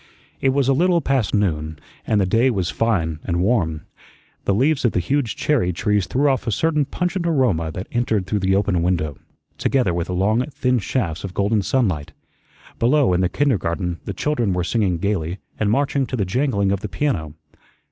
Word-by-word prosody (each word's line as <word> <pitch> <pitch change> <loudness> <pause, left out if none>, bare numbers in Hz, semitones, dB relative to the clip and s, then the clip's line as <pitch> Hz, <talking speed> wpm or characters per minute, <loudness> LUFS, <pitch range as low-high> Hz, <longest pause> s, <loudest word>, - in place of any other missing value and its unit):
It 135 - +2
was 135 0 +1
a 135 - +4
little 175 +4 +3
past 135 -7 0
noon, 80 -6 -1 0.3
and 110 - +2
the 95 - +2
day 115 +7 +3
was 95 - -1
fine 80 -3 0
and 85 -2 -1
warm. 90 -6 +1 0.6
The 100 - +2
leaves 140 +6 +2
of 120 - +2
the - - +1
huge 125 +6 -1
cherry 125 -12 +1
trees 100 +2 0
threw 135 +9 +1
off 130 -2 0
a - - +1
certain 150 +5 +1
pungent 180 +3 -2
aroma 120 - +1
that 95 - -5
entered 110 -5 0
through 105 +2 -1
the 95 0 +2
open 100 -3 +1
window, 85 -5 -1 0.4
together 125 -10 +1
with 85 +1 -2
long 100 +6 +1
thin 125 -3 0
shafts 95 -7 -2
of 95 -2 -6
golden 105 +1 +1
sunlight. 90 - 0 0.7
Below, 130 -3 +3
in 90 - +2
the 90 - +2
kindergarten, 90 - -1
the 100 - -4
children 120 -6 0
were 90 -1 0
singing 95 -1 0
gayly 90 -2 -2 0.2
and 105 - +1
marching 135 +2 +1
to - - -3
the 105 -5 0
jangling 100 -2 0
of 100 - 0
the 105 - -6
piano. 90 - -2
105 Hz, 190 wpm, -21 LUFS, 90-130 Hz, 0.7 s, a